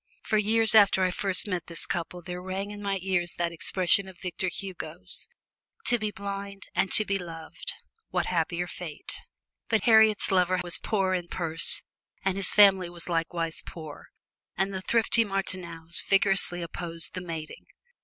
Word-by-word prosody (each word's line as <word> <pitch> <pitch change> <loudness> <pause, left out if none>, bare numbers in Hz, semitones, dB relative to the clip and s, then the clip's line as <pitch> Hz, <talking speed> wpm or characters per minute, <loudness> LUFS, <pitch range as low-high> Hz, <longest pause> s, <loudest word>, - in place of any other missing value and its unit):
For 215 - +1
weeks 220 +2 +2
after 200 -3 +6
I 185 - +2
first 195 +1 +2
met 180 -4 -3
this 170 -1 +5
couple 175 +1 -4
there 180 +1 -6
rang 190 +2 -4
in 205 0 -8
my 200 -1 -1
ears 175 -2 0
that 170 -1 0
expression 185 +3 +2
of 190 -2 -12
Victor 185 +1 -3
Hugo's, 170 - -5 0.6
"To 240 -1 +4
be 215 -1 -1
blind 200 0 -6
and 195 - +1
to 215 - +5
be 195 -1 -1
loved 165 -2 -6 0.4
what - - 0
happier 170 0 -1
fate!" 175 -3 -7 0.5
But 220 - +2
Harriet's 220 -3 +5
lover 185 -1 +3
was 175 -1 +3
poor 195 -3 0
in 175 -2 -2
purse 165 -2 -1 0.4
and 190 -1 +1
his 195 -2 +2
family 195 -4 +6
was 175 0 -8
likewise 165 -1 -1
poor, 155 -3 -10 0.5
and 195 +1 0
the 190 - -4
thrifty 230 +2 +3
Martineaus 180 -5 -2
vigorously 195 -3 +4
opposed 165 -1 -2
the 180 - -4
mating. 165 -3 -7
185 Hz, 165 wpm, -27 LUFS, 170-195 Hz, 0.6 s, after